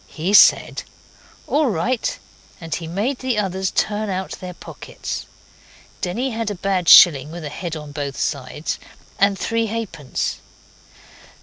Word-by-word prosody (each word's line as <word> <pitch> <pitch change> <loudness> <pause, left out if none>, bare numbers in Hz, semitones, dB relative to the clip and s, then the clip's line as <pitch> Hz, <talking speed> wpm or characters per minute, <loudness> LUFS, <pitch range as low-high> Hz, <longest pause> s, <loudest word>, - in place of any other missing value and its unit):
He 170 +5 -3
said 210 - +6 0.6
'All 295 0 +1
right,' 220 +6 -1 0.4
and 165 -2 -6
he 165 - -4
made 210 +11 -2
the 255 -3 -1
others 190 -2 -1
turn 215 0 -1
out 190 0 -3
their 180 -1 -7
pockets. - - -7 0.7
Denny 235 +9 -2
had 225 -1 -2
a 205 - -4
bad 185 -1 0
shilling, 145 -4 +8
with 165 0 -7
a - - -4
head 165 +2 -5
on 150 -2 -8
both 145 -1 -5
sides, 140 +1 -3 0.4
and 200 0 +3
three 230 +2 -1
halfpence. 200 - -3
190 Hz, 140 wpm, -21 LUFS, 160-215 Hz, 0.7 s, shilling